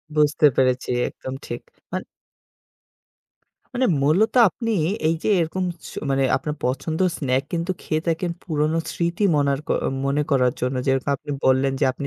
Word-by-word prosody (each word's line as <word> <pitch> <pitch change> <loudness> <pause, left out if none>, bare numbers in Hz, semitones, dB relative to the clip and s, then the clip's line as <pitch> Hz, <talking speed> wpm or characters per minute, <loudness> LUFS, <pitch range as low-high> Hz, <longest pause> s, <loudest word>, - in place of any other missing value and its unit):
বুঝতে 150 0 +3
পেরেছি 130 -1 +1 0.2
একদম 130 - -8
ঠিক - - -5 0.3
মান - - -2 1.7
মানে 255 +1 +2 0.2
মূলত 190 - +3
আপনি 230 +4 -4 0.4
এই 165 - +2
যে - - -1
এরকম 180 +3 -1 0.2
ছু - - -11
মানে 135 0 +2
আপনার 150 +3 -3
পছন্দ 150 +5 -1 0.2
স্নাকস 145 +6 -1
খেয়ে 155 0 -1
থাকেন 165 +2 0
পুরনো 155 0 0
স্মৃতি 170 +4 -1
মনারক 140 0 0 0.4
মনে 140 +2 +1
করার 125 -3 +3
জন্য। 125 +1 -1
যেরকম 135 0 +1
আপনি 145 +2 -9
বললেন 130 +1 +3
যে - - +4
আপনি 140 +2 -5
150 Hz, 145 wpm, -23 LUFS, 135-165 Hz, 1.7 s, যে